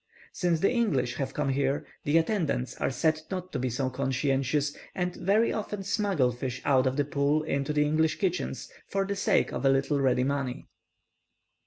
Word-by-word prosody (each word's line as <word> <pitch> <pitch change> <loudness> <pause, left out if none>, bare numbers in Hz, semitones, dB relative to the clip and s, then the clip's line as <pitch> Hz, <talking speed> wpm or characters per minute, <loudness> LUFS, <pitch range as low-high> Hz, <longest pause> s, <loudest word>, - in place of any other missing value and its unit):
Since 175 -4 0
the - - +3
English 160 - 0
have 135 -1 -3
come 150 -2 0
here, 140 +1 0 0.2
the 145 +3 +3
attendants 165 - 0
are - - 0
said 155 +4 +1
not 185 -1 -4
to 140 - -2
be 130 0 -1
so 130 +2 -1
conscientious, 135 +2 0 0.2
and 180 -1 -2
very 210 +5 +2
often 210 -2 -4
smuggle 195 - +1
fish 125 +1 -4
out 130 -2 +4
of 130 +2 -1
the 145 - +2
pool 145 +2 +1
into 140 -2 -1
the 150 0 +2
English 155 +1 +1
kitchens, 185 -3 -2 0.2
for 195 0 0
the 200 +1 -2
sake 200 - +2
of - - -4
a 135 - +5
little 135 +2 +2
ready 125 -1 +3
money. 135 -2 -2
145 Hz, 185 wpm, -28 LUFS, 135-180 Hz, 0.2 s, a